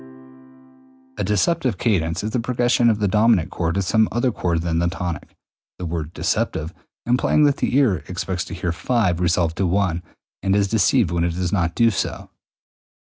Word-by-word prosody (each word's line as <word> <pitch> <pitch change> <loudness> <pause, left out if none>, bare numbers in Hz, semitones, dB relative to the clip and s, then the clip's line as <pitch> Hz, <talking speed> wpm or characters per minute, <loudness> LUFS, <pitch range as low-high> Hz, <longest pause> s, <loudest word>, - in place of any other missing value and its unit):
A - - 0
deceptive 115 - +1
cadence 90 -5 0
is 110 - -3
the 125 - 0
progression 120 0 +2
of 110 - +2
the 105 -1 0
dominant 105 -3 +3
chord 85 -1 -2
to 100 - 0
some 110 +4 +2
other 120 +2 +1
chord 85 -5 -1
than 85 -1 0
the 85 - +1
tonic, 90 -2 -5 0.4
the 90 - -5
word 80 -2 -4
deceptive 80 -1 -2 0.3
implying 125 +5 +2
that 145 -2 +3
the 130 - 0
ear 125 -10 +3
expects 90 0 -3
to - - -7
hear 85 -1 -2
V 105 +5 +1
resolve 85 -1 +1
to 90 +2 0
I 90 -4 0 0.4
and 95 0 +1
is 100 -1 +2
deceived 110 -1 +2
when 85 -1 0
it 85 -1 -1
does 90 +1 -2
not 85 -4 0
do 115 -1 +4
so. 100 - -4
95 Hz, 180 wpm, -21 LUFS, 85-115 Hz, 0.4 s, do